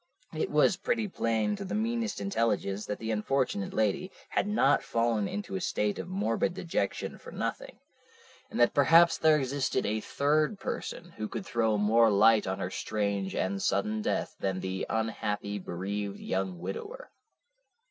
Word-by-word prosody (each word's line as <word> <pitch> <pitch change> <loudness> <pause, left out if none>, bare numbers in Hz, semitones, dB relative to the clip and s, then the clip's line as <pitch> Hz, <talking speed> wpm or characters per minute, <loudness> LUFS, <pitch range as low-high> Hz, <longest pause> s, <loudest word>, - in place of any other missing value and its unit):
It 155 - -1
was 150 +5 +4
pretty 225 +2 0
plain 110 - 0
to - - -5
the 190 +2 -4
meanest 230 0 -1
intelligence 105 - -1
that 105 - -3
the 110 0 -3
unfortunate 110 -1 0
lady 110 - 0 0.2
had - - 0
not 175 -9 +3
fallen 115 -3 0
into 205 - -5
a 190 - -2
state 105 - 0
of - - -5
morbid 180 - 0
dejection 165 - -2
for - - -11
nothing, - - -4 0.7
and - - -4
that 120 - +5
perhaps 165 +4 +6
there 155 -1 +5
existed 135 -1 -1
a 110 +1 0
third 150 - +1
person 175 +1 -5
who 110 - -3
could 190 - -5
throw 110 - +1
more 110 +2 +4
light 105 +1 +5
on 95 0 -1
her 90 - -3
strange 100 -2 -2
and 95 +1 -1
sudden 105 +2 0
death - - -1
than 95 -1 -1
the 95 0 -3
unhappy, 105 -2 -2
bereaved 100 +3 -4
young 95 -1 -2
widower. 410 - -7
110 Hz, 160 wpm, -29 LUFS, 100-160 Hz, 0.7 s, perhaps